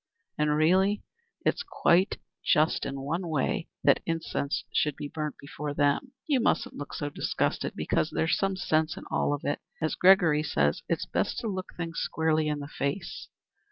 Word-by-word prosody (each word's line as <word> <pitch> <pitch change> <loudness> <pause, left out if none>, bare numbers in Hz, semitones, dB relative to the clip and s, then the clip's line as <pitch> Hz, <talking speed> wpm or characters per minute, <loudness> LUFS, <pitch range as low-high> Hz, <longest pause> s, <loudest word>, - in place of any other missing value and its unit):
And 150 0 +2
really, 190 +6 +3 0.4
it's - - +2
quite 185 - +2 0.3
just 155 +1 +3
in 135 0 -4
one 165 +6 -2
way 155 +1 0 0.2
that - - +5
incense 165 -3 -1
should 150 -2 +2
be 150 -1 -5
burnt 150 0 -4
before 145 +1 -5
them. 145 - +1
You 285 -4 +2
mustn't - - +1
look 145 - -6
so 145 0 -3
disgusted, - - -1
because 155 - 0
there's 160 - +1
some 195 -1 0
sense 160 -3 +1
in - - -7
it - - -12
all. 145 0 +1 0.4
As 155 -1 0
Gregory 180 -5 +5
says, 75 - +1
it's - - 0
best - - -1
to 230 - -3
look 190 -3 -4
things 165 -1 -3
squarely 160 -1 +1
in 150 -1 0
the 140 - -6
face. 145 +6 -4
155 Hz, 170 wpm, -28 LUFS, 145-180 Hz, 0.4 s, that